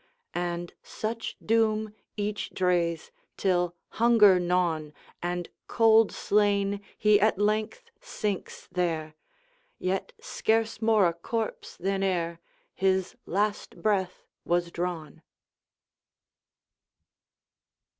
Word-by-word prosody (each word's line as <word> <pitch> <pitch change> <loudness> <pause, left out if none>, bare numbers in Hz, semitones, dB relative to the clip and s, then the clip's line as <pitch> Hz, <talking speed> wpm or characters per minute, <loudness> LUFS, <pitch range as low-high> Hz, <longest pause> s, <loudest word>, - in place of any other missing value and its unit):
And 175 0 -3
such 225 +1 -5
doom 220 -1 +2 0.2
each 210 0 -2
drees, 175 -3 0 0.3
Till, 175 -2 +1 0.3
hunger 215 -6 +7
gnawn, 175 -4 0 0.3
And 175 0 -2 0.2
cold 225 -1 +5
slain, 200 -1 +1 0.2
he 210 -1 +5
at 215 -1 +3
length 215 - -1
sinks 210 - -4
there, 165 -4 -1 0.6
Yet 190 +1 -2
scarce 225 0 0
more 220 -3 +4
a 170 - 0
corpse 220 +6 -4
than 195 +2 -1
ereHis 185 +1 -1
last 205 +3 -1
breath 190 -4 0 0.2
was 175 0 0
drawn. 170 -3 -4
195 Hz, 90 wpm, -28 LUFS, 175-215 Hz, 0.6 s, hunger